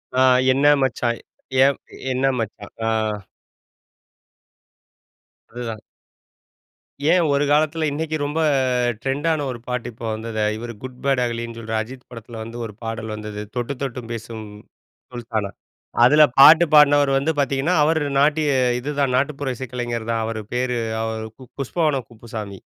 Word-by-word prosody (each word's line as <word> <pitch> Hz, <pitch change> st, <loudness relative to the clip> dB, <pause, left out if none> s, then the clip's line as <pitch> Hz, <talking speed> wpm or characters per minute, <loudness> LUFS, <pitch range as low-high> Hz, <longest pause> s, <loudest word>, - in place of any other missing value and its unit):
ஆ 130 Hz, -, +3 dB, 0.3 s
என்ன 135 Hz, +2 st, +2 dB, 0.2 s
மச்சான் 120 Hz, -2 st, 0 dB, 0.5 s
ஏப் 140 Hz, -, 0 dB, 0.3 s
என்ன 130 Hz, +1 st, 0 dB
மச்சான். 105 Hz, -2 st, -6 dB
ஆ. -, -, +2 dB, 2.6 s
அதுதான். 115 Hz, -3 st, -5 dB, 1.3 s
ஏன், 175 Hz, -3 st, +3 dB
ஒரு 140 Hz, +1 st, +2 dB
காலத்தில 155 Hz, +1 st, +2 dB
இன்னைக்கு 155 Hz, +1 st, -2 dB
ரொம்ப 145 Hz, +3 st, -2 dB, 0.6 s
ட்ரெண்டான 145 Hz, +3 st, 0 dB
ஒரு 120 Hz, -2 st, -5 dB
பாட்டு 125 Hz, -1 st, -3 dB
இப்போ 115 Hz, +1 st, -9 dB
வந்தது, 110 Hz, 0 st, -3 dB
இவரு 120 Hz, +1 st, -6 dB
குட் 130 Hz, -1 st, -7 dB
பாட் 135 Hz, -2 st, +2 dB
அகலின்னு 115 Hz, -1 st, -4 dB
சொல்ற 110 Hz, 0 st, -6 dB
அஜித் 125 Hz, +3 st, -10 dB
படத்தில 115 Hz, -1 st, -9 dB
வந்து 115 Hz, +1 st, -8 dB
ஒரு 105 Hz, -, -8 dB
பாடல் 115 Hz, -1 st, -4 dB
வந்தது, 105 Hz, -1 st, -6 dB
தொட்டு 125 Hz, +3 st, -2 dB
தொட்டு 125 Hz, -2 st, -3 dB
பேசும் 110 Hz, -1 st, -7 dB, 0.7 s
சுல்தானா. 110 Hz, -4 st, -3 dB, 0.5 s
அதில 150 Hz, +4 st, +7 dB, 0.2 s
பாட்டு 160 Hz, +5 st, +9 dB
பாடுனவர் 145 Hz, -1 st, +6 dB
வந்து 150 Hz, +4 st, +1 dB
பாத்தீங்கன்னா, 140 Hz, +5 st, +1 dB
அவர் 160 Hz, 0 st, +2 dB, 0.2 s
நாட்டிய 150 Hz, +1 st, +3 dB, 0.3 s
இதுதான் 140 Hz, -1 st, -1 dB
நாட்டுப்புற 140 Hz, -1 st, -1 dB
இசைக்கலைஞர் 120 Hz, -3 st, -4 dB
தான் 115 Hz, -1 st, 0 dB
அவர் 110 Hz, -1 st, -4 dB
பேரு 125 Hz, -1 st, 0 dB, 0.2 s
அவரு 110 Hz, 0 st, -4 dB, 0.3 s
புஷ்பவனம் 140 Hz, -3 st, 0 dB
குப்புசாமி. 110 Hz, -4 st, -8 dB
125 Hz, 130 wpm, -22 LUFS, 115-145 Hz, 2.6 s, பாட்டு